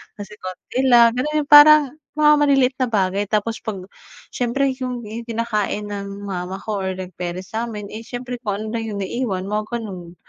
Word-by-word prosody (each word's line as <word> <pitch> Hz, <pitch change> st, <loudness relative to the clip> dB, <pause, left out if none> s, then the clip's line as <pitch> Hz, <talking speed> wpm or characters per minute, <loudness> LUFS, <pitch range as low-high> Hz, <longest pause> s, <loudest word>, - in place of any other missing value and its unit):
Kasi 205 Hz, 0 st, -9 dB
konti 185 Hz, +6 st, -6 dB
lang 235 Hz, -2 st, +7 dB
ganun, 300 Hz, +3 st, 0 dB
yung 290 Hz, -, -18 dB
parang 295 Hz, -1 st, +9 dB, 0.2 s
mga 300 Hz, 0 st, +5 dB
maliliit 270 Hz, -3 st, +3 dB
na 255 Hz, -, +2 dB
bagay 200 Hz, -2 st, 0 dB
tapos 215 Hz, +2 st, -1 dB
'pag 200 Hz, -5 st, -6 dB, 0.5 s
siyempre, 245 Hz, +3 st, -1 dB, 0.2 s
yung 250 Hz, -2 st, -3 dB, 0.3 s
kinakain 215 Hz, -2 st, -2 dB
ng 200 Hz, 0 st, -6 dB
mama 180 Hz, 0 st, -4 dB
ko 215 Hz, -1 st, -3 dB
or 190 Hz, -1 st, -2 dB
like 185 Hz, 0 st, -7 dB
parents 180 Hz, +1 st, -5 dB
sa'min. 220 Hz, -2 st, -4 dB
Eh, 215 Hz, -, -6 dB
siyempre 245 Hz, +1 st, -6 dB
kung 210 Hz, -3 st, -3 dB
ano -, -, -6 dB
lang 225 Hz, -, -4 dB
yung 200 Hz, -, -3 dB
naiwan 195 Hz, -3 st, -2 dB
mga 210 Hz, 0 st, -1 dB
ganon. 185 Hz, -7 st, -7 dB
220 Hz, 180 wpm, -21 LUFS, 195-250 Hz, 0.5 s, parang